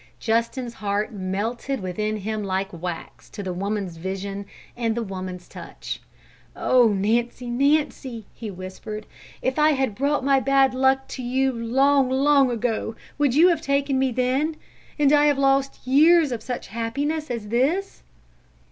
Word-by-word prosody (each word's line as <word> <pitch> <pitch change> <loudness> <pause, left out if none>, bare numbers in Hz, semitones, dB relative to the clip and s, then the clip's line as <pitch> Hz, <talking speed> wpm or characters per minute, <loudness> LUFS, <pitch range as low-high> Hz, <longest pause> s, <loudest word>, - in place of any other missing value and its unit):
Justin's 235 +2 -1
heart 205 0 -2
melted 215 +7 -3
within 210 +3 -2
him 215 +1 -3
like 195 0 -2
wax 170 0 -7
to 205 - -7
the 185 -1 -3
woman's 195 -2 -3
vision 195 +3 -5 0.3
and 230 -2 -1
the 235 - -1
woman's 185 -3 -6
touch. - - -8 0.5
"Oh, 250 -2 +4
Nancy, 235 +4 0
Nancy!" 270 -3 0
he 225 - -7
whispered. 195 +3 -7 0.4
"If 260 +3 0
I 305 0 +5
had 265 -5 0
brought 280 +5 0
my 275 0 +4
bad 270 0 +3
luck 265 +1 +2
to 260 - -6
you 260 +2 +1
long, 265 +4 +2
long 275 0 +4
ago, 230 -1 -2 0.2
would 280 -4 +2
you 340 +5 +7
have 335 -3 +1
taken 280 -2 +1
me 265 -1 +2
then, 260 +6 0 0.4
and 290 -2 +4
have 295 - +6 0.2
I - - -3
lost 275 -1 +1
years 305 +3 +5
of 235 -2 -3
such 245 +2 -5
happiness 280 +8 -2
as 230 -4 -4
this?" 295 - 0
245 Hz, 155 wpm, -24 LUFS, 210-275 Hz, 0.5 s, you